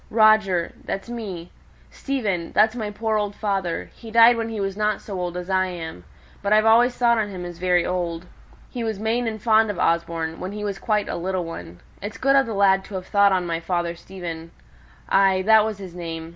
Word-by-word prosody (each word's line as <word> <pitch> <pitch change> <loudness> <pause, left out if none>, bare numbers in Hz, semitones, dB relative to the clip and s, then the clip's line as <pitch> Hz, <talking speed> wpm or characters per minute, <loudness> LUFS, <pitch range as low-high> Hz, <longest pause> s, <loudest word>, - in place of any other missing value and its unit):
"'Roger,' 215 -6 +3
that's 195 +4 -5
me, 195 -8 -6 0.4
'Stephen,' 205 -11 -2
that's 220 +2 +4
my 220 -3 -3
poor 220 +1 -1
old 205 -1 -3
father: 195 -5 -2
he 230 - -12
died 230 +1 +7
when 230 -1 -3
he 220 -2 -5
was 195 -1 -2
not 210 0 0
so 195 -3 -6
old 175 0 -3
as 180 0 -6
I 185 -1 +1
am; 165 - -7 0.4
but 200 - -2
I've 215 +1 +5
always 240 +3 +4
thought 235 -2 +3
on 210 -1 -1
him 180 -3 -6
as 175 -1 -8
very 180 -1 +2
old. 175 -1 -3 0.5
He 245 - -4
was 220 -2 -2
main 225 +3 -1
and 220 -1 -3
fond 220 0 +3
of 205 - -3
Osborne, 165 -1 -1
when 185 +2 -5
he 210 0 -5
was 200 -1 -3
quite 210 -2 0
a - - -3
little 185 0 -2
one. 85 - -9 0.2
It's 205 +2 -6
good 275 +1 +3
of 270 -2 +4
the 225 - -4
lad 195 -1 +4
to 200 - -9
have 185 -1 -5
thought 200 0 +4
on 185 -2 +1
my 165 -1 -2
father 170 0 -2
Stephen. 170 -2 -8 0.6
Ay! 195 -1 +3
that 220 +1 +6
was 215 -2 -3
his 190 -3 -9
name. 165 -2 -6
195 Hz, 220 wpm, -23 LUFS, 175-220 Hz, 0.6 s, died